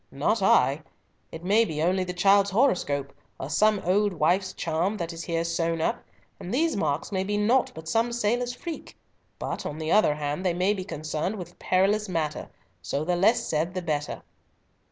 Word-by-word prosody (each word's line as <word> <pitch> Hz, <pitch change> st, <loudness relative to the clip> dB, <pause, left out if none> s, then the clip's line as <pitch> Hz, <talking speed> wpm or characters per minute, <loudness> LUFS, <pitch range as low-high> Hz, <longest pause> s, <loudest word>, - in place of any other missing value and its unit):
"Not 175 Hz, +11 st, 0 dB
I. 140 Hz, -6 st, +4 dB, 0.5 s
It 160 Hz, -, -8 dB
may 205 Hz, +5 st, +4 dB
be 155 Hz, -9 st, -4 dB
only 185 Hz, +2 st, +2 dB
the 180 Hz, -, -4 dB
child's 195 Hz, +2 st, +4 dB
horoscope, 180 Hz, -, +1 dB, 0.3 s
or 135 Hz, -, -5 dB
some 215 Hz, +3 st, +4 dB
old 200 Hz, +2 st, +2 dB
wife's 180 Hz, +4 st, +1 dB
charm 170 Hz, +6 st, -1 dB
that 170 Hz, -2 st, -4 dB
is 165 Hz, 0 st, -6 dB
here 165 Hz, -1 st, -1 dB
sewn 165 Hz, 0 st, -1 dB
up, 160 Hz, -, -1 dB, 0.4 s
and 180 Hz, -, -7 dB
these 320 Hz, +4 st, +1 dB
marks 155 Hz, -4 st, -1 dB
may 190 Hz, -1 st, 0 dB
be 205 Hz, +2 st, -1 dB
naught 235 Hz, +5 st, +2 dB
but 160 Hz, 0 st, -9 dB
some 225 Hz, +7 st, +1 dB
sailor's 240 Hz, +2 st, 0 dB
freak; 330 Hz, +4 st, -8 dB, 0.4 s
but, -, -, -4 dB
on 150 Hz, -, -5 dB
the 155 Hz, 0 st, -3 dB
other 210 Hz, -8 st, +4 dB
hand, 150 Hz, +3 st, -3 dB
they 180 Hz, -2 st, +1 dB
may 185 Hz, +3 st, +2 dB
be 190 Hz, -3 st, -4 dB
concerned 155 Hz, +2 st, -3 dB
with 175 Hz, -3 st, -9 dB
perilous 200 Hz, +3 st, +1 dB
matter, 155 Hz, -4 st, -2 dB, 0.3 s
so 140 Hz, +11 st, -2 dB
the 180 Hz, +1 st, +1 dB
less 225 Hz, +7 st, +3 dB
said 165 Hz, +4 st, -1 dB
the 185 Hz, -, -1 dB
better." 150 Hz, -3 st, -3 dB
180 Hz, 190 wpm, -26 LUFS, 160-210 Hz, 0.5 s, I